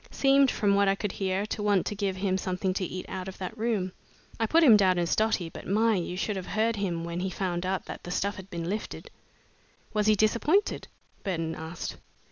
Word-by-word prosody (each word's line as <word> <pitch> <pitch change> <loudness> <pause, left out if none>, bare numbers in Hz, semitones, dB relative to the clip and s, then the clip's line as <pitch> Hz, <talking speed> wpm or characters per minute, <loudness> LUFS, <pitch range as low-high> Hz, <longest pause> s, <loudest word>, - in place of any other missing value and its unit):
Seemed, 275 0 +4
from 205 -4 +2
what 200 0 +4
I 195 - +3
could 205 -1 -3
hear, 190 +1 -1
to 215 - -4
want 205 -3 +2
to - - -2
give 200 -2 -1
him 190 0 0
something 185 0 -1
to 190 - -2
eat 185 +1 -4
out 185 -1 -5
of 190 - -7
that 190 +3 -5
room. 215 -5 -1 0.5
I 225 - +1
put 330 +7 +4
him 245 -8 +9
down 190 -3 +4
as 170 -1 +1
dotty, 215 -5 +1
but 165 - -10
my! 220 +3 +3
you 180 -2 -2
should 205 +1 -1
have 185 - -6
heard 220 +1 +1
him 175 -5 -2
when 170 +1 -4
he 190 +1 -1
found 180 -1 -2
out 190 0 -1
that - - -7
the - - -7
stuff 200 +3 -1
had 190 0 -10
been 170 -2 -4
lifted!" 210 +4 -5 0.8
"Was 210 -1 +1
he 215 - +6
disappointed?" 235 - +2 0.4
Burton 165 -5 -2
asked. 160 +1 -6
195 Hz, 225 wpm, -28 LUFS, 185-215 Hz, 0.8 s, him